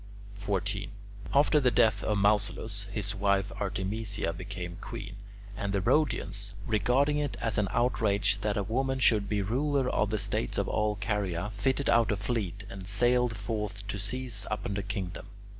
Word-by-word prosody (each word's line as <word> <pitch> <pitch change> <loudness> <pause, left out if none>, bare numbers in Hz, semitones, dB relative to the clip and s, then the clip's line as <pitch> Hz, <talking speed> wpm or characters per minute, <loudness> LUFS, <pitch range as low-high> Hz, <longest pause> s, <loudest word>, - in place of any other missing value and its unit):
14. 100 0 -2 0.4
After 150 +2 +4
the 130 -3 +4
death 110 -2 +3
of 105 - +1
Mausolus, 100 0 +2
his 100 0 0
wife 100 0 +1
Artemisia 100 -1 -2
became 90 -1 -6
queen, 100 -4 -7 0.4
and 100 0 -2
the 100 - +2
Rhodians, 100 - 0
regarding 125 +7 +2
it 145 -3 -2
as 110 -2 0
an 105 - +1
outrage 105 -2 +1
that 105 -1 0
a 100 - +1
woman 130 +5 0
should 105 -6 +3
be 105 -2 +1
ruler 135 +5 +1
of 105 -4 +1
the 110 - 0
states 100 -11 -1
of - - 0
all 105 0 +1
Caria, 100 -2 -2
fitted 130 +7 0
out 115 -2 +4
a 105 - 0
fleet 100 -2 -2
and 95 -2 -8
sallied 120 +1 +2
forth 105 -1 -4
to 100 - -3
seize 110 -1 -2
upon 105 -1 -2
the 100 - -1
kingdom. 95 -3 -5
105 Hz, 165 wpm, -29 LUFS, 100-115 Hz, 0.4 s, After